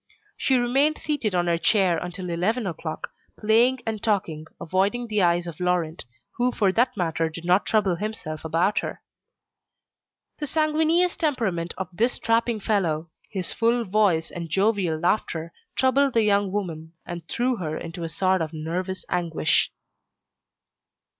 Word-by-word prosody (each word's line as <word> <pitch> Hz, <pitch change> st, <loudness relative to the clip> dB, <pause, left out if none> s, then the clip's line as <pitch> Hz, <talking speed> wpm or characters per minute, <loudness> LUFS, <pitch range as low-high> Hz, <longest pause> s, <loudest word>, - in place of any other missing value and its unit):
She 265 Hz, -, +2 dB
remained 270 Hz, +5 st, +2 dB
seated 250 Hz, -10 st, -1 dB
on 175 Hz, -1 st, +2 dB
her 170 Hz, -1 st, +1 dB
chair 185 Hz, -4 st, +3 dB
until 180 Hz, 0 st, -5 dB
eleven 210 Hz, +8 st, 0 dB
o'clock, 160 Hz, -3 st, -5 dB, 0.3 s
playing 235 Hz, +4 st, +3 dB
and 220 Hz, -2 st, -3 dB
talking, 165 Hz, -8 st, -1 dB
avoiding 195 Hz, +8 st, 0 dB
the 210 Hz, -3 st, 0 dB
eyes 175 Hz, -1 st, +3 dB
of 170 Hz, -1 st, -7 dB
Laurent, 180 Hz, -2 st, 0 dB, 0.3 s
who 250 Hz, +1 st, +2 dB
for 200 Hz, -5 st, +2 dB
that 245 Hz, +3 st, +1 dB
matter 165 Hz, -2 st, 0 dB
did 165 Hz, +1 st, -9 dB
not 180 Hz, +3 st, +3 dB
trouble 195 Hz, -5 st, +2 dB
himself 185 Hz, -7 st, -5 dB
about 165 Hz, +6 st, +1 dB
her. -, -, -6 dB, 1.4 s
The 295 Hz, -, -3 dB
sanguineous 320 Hz, +4 st, +2 dB
temperament 225 Hz, -, -1 dB
of 185 Hz, -2 st, -5 dB
this 235 Hz, +6 st, +2 dB
strapping 230 Hz, 0 st, +1 dB
fellow, 170 Hz, -7 st, 0 dB, 0.2 s
his 185 Hz, -3 st, -4 dB
full 235 Hz, 0 st, +2 dB
voice 185 Hz, -5 st, +2 dB
and 170 Hz, -1 st, -6 dB
jovial 190 Hz, -2 st, +1 dB
laughter, 170 Hz, -1 st, -1 dB, 0.2 s
troubled 265 Hz, +1 st, +3 dB
the 225 Hz, -, +5 dB
young 200 Hz, -2 st, +2 dB
woman 165 Hz, -5 st, -4 dB
and 170 Hz, -2 st, -7 dB
threw 245 Hz, +1 st, 0 dB
her 155 Hz, -5 st, -3 dB
into 170 Hz, +1 st, -6 dB
a 165 Hz, -, -3 dB
sort 185 Hz, +2 st, +1 dB
of 160 Hz, 0 st, -3 dB
nervous 180 Hz, +4 st, -4 dB
anguish. 165 Hz, -3 st, +1 dB
190 Hz, 150 wpm, -25 LUFS, 170-230 Hz, 1.4 s, the